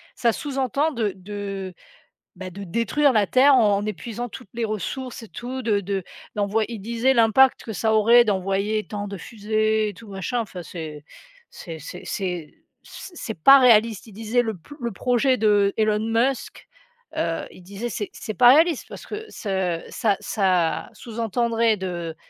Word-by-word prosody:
ça 235 -2 +2
sous-entend 275 +2 -1
de 220 -6 -1
de, 195 -1 -6 0.6
bah, 185 0 -7
de 200 +3 -8
détruire 245 - +2
la 210 -2 +3
terre 270 +2 +5
en 205 -4 +3
épuisant 230 +4 -5
toutes 195 - -11
les 230 -1 -1
ressources 230 +4 -5
et - - -10
tout 255 +2 -6
de 210 -3 +2
de 195 -1 -3 0.3
d'envoy 210 +1 +1
il 230 -3 -6
disait 235 +5 +1
l'impact 235 +3 +4
que 220 - -6
ça 220 +2 +1
aurait 235 +3 +6
d'envoyer 200 +2 0
tant 205 -1 -5
de 200 -1 -6
fusées 215 +2 0
et - - -8
tout 215 +2 -13
machin, 195 +5 -2
enfin, 185 -5 -7
c'est 155 -4 -8 0.5
c'est 165 -2 -9
c'est 180 +4 -9
c'est 180 -6 -4 0.3
c - - -10
c'est 220 - -5
pas 275 0 +9
réaliste, 230 -3 +4
il 210 - -13
disait: 225 +3 0
«Le 220 -3 -3
p 235 - -14
le 235 -1 -2
projet 250 +4 +1
de 205 -2 +3
Elon 215 -1 +2
Musk», 230 +4 -1 0.5
heu, 165 0 -1
il - - -15
disait: 200 +6 -5
«C'est 205 -1 -4
c'est 215 - -6
pas 245 +4 +7
réaliste» 325 -2 +3
parce - - -9
que 430 +1 -6
ce 190 -5 -2
ça 210 -4 0
ça 185 -5 0
sous 230 -1 -9
entendrait 230 0 +1
de, 175 -3 -4
215 Hz, 175 wpm, -23 LUFS, 195-235 Hz, 0.6 s, pas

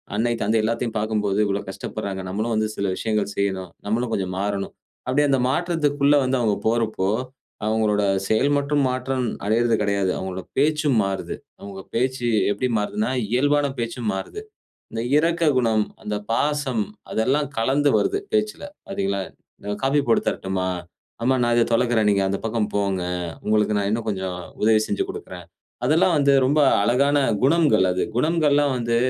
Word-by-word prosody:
அன்னை, 120 +3 +1
தந்தை 110 +2 +2
எல்லாத்தையும் 115 +1 -1
பாக்கும்போது 105 -2 0
இவ்ளோ 100 0 0
கஷ்டப்படுறாங்க, 95 0 -5
நம்மளும் 110 +5 -2
வந்து 110 0 +1
சில 100 - -1
விஷயங்கள் 105 -1 -1
செய்யணும், 95 -2 -1 0.2
நம்மளும் 115 +3 -1
கொஞ்சம் 95 -2 -2
மாறணும், 100 0 -2 0.3
அப்டியே 145 +3 +2
அந்த 135 -1 +3
மாற்றத்துக்குள்ள 145 -3 +2
வந்து 130 0 +1
அவங்க 110 -4 +1
போறப்போ, 110 -4 0 0.6
அவங்களோட 110 -1 +1 0.2
செயல் 120 +6 +2
மட்டும் 145 +1 +1
மாற்றம் 130 0 -1 0.2
அடைறது 115 +2 +2
கடையாது. 100 -2 +1
அவங்க 95 0 -4 0.2
பேச்சும் 150 -2 +2
மாறுது. 95 -1 -3 0.2
அவங்க 100 -1 -8
பேச்சு 125 0 0 0.2
எப்டி 105 +5 -1
மாறுதுனா, 205 - -1 0.2
இயல்பான 145 +3 +3
பேச்சும் 115 -1 -3
மாறுது, 95 - -5 0.5
இந்த 115 - -3 0.2
இரக்க 170 +2 +1 0.2
குணம், 110 -3 +2 0.2
அந்த 105 0 -3 0.2
பாசம் 145 - 0 0.3
அதெல்லாம் 135 +6 +1
கலந்து 135 +5 +2
வருது 395 +1 0 0.2
பேச்சில, 215 0 0 0.3
பாத்தீங்களா? 100 - -1 0.6
காஃபி 135 +2 +3
போட்டு 115 - +3
தரட்டுமா? 95 -1 -2 0.5
அம்மா 130 +2 +3
நான் 120 0 +2
இத 120 - +4
தொலக்குறேன். 115 -2 +2
நீங்க 100 -1 +2
அந்த 100 0 -1
பக்கம் 110 -2 -1
போங்க, 100 -2 0 0.4
உங்களுக்கு 105 0 +2
நான் 100 -1 0
இன்னும் 115 +1 -2
கொஞ்சம் 95 -3 -3 0.3
உதவி 110 0 +5
செஞ்சு - - -1
கொடுக்குறேன். 415 0 -9 0.4
அதெல்லாம் 175 +3 +3
வந்து 140 -1 +4
ரொம்ப 145 +4 +3 0.2
அழகான 140 +7 +3 0.2
குணங்கள், 145 - +4
அது 90 - -1
குணங்கள்லாம் 145 -1 +2
வந்து 120 -1 0
115 Hz, 150 wpm, -23 LUFS, 105-140 Hz, 0.6 s, உதவி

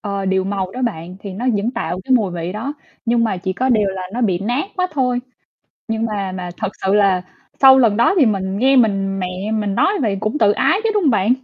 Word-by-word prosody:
ờ, 200 -2 -3
điều 190 0 +1
màu 195 -1 -2
đó 255 - -5
bạn, 180 -6 -3
thì 200 - -7
nó 225 +7 -4
vẫn 205 +4 -1
tạo 230 -7 -4
cái 260 - 0
mùi 220 -7 +3
vị 170 +1 -4
đó, 225 +8 -4 0.3
nhưng 235 0 +2
mà 215 -4 -1
chỉ 185 +1 -3
có 255 +7 -1
điều 215 -5 +3
là 190 -1 -4
nó 240 - -3
bị 195 -7 +1
nát 245 - -2
quá 365 -1 +1
thôi. 250 -3 0 0.7
Nhưng 225 0 -1
mà 200 -4 -3
mà 180 -1 -5
thật - - -2 0.2
sự 190 - +2
là 195 -3 +3 0.4
sau 265 -1 +8
lần 225 -5 +3
đó 235 +10 +4
thì 285 - +6
mình 195 -3 -1
nghe 265 +3 +4
mình 195 -5 +2
mẹ 180 - -2 0.3
mình 210 -2 -1
nói - - +3
vậy 205 -5 0
cũng 215 +6 -2
tự 210 -7 +4
ái 385 - +2
chứ, 450 - +1
đúng 415 -3 +1
hông 295 - +4
bạn? 215 0 +3
210 Hz, 250 wpm, -19 LUFS, 190-245 Hz, 0.7 s, sau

